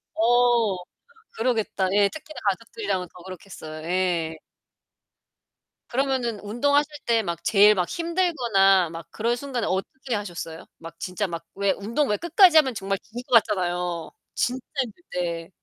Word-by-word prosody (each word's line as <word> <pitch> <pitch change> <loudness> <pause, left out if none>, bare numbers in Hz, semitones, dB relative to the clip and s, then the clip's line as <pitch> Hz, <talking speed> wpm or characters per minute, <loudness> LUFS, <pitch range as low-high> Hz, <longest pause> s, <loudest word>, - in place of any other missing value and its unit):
어. 235 -3 +3 0.6
그러겠다. 220 -5 0
예 205 -1 +5
특히나 310 0 -10
가족들이랑은 230 - -3
더 180 - -13
그렇겠어요. 175 -4 -9
예. 175 -3 0 1.5
그러면은 255 -4 0
운동하실 285 +8 +1 0.2
때 230 -1 +2
막 170 -4 -4
제일 210 0 +6
막 180 -4 -1
힘들거나 245 - +2
막 165 0 -8
그럴 235 +2 -1
순간에 255 -2 -3
어떻게 245 +7 -3
하셨어요? 175 -5 -6
막 165 0 -11
진짜 185 +3 -2
막 170 -2 -6
왜 200 0 +2
운동 230 +10 -1
왜 210 - +1
끝까지 345 0 +5
하면 270 -5 +5
정말 195 -1 -2
죽을 240 +4 -9
것 230 -3 +6
같잖아요. 180 -4 -2 0.2
진짜 250 +1 -1 0.2
힘들 250 +8 -12
때. 170 -2 -3
210 Hz, 305 characters per minute, -25 LUFS, 180-245 Hz, 1.5 s, 제일